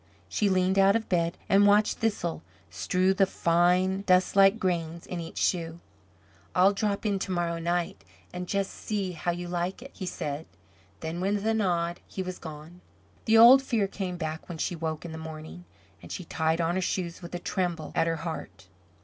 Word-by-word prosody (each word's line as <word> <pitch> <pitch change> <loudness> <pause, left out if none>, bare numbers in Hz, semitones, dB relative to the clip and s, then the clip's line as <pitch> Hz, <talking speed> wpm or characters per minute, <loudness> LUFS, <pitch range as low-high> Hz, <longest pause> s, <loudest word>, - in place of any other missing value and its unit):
She 210 - +1
leaned 185 +1 +2
out 195 +1 +5
of 225 -1 -1
bed, 170 -1 +1
and 200 +1 +5
watched 205 +1 +3
Thistle 205 -7 -1 0.3
strew 185 - +1
the 195 0 +3
fine 180 +3 +2
dustlike 195 +2 +5
grains 170 -4 -2
in 180 - -5
each 165 -1 -8
shoe. 165 -2 0 0.8
"I'll 190 +3 +5
drop 200 +1 -1
in 200 -2 +1
to 190 - -3
morrow 170 -2 -1
night, 170 +1 -2 0.3
and 180 0 -5
just 195 0 -1
see 200 -4 -3
how 175 0 -4
you 175 0 -2
like 175 +5 -3
it," 275 - -11
he 185 - -6
said. 150 -2 -4 0.5
Then, 165 +2 -4
with 200 +2 0
a 225 - +2
nod, 175 -5 0
he 190 - -4
was 185 0 -6
gone. 160 +2 -10 0.4
The 225 0 +5
old 245 +4 +9
fear 230 -6 0
came 190 -2 -4
back 160 0 -5
when 170 - -5
she 175 - -2
woke 160 0 -4
in 170 - -6
the 160 - -7
morning, 160 +2 -9 0.4
and - - -11
she 185 - -5
tied 160 +1 0
on 165 0 +1
her 190 - 0
shoes 175 -1 -2
with 175 0 -7
a - - 0
tremble 175 -3 -2
at 165 - +2
her 165 - +1
heart. 160 - -6
180 Hz, 190 wpm, -28 LUFS, 170-195 Hz, 0.8 s, old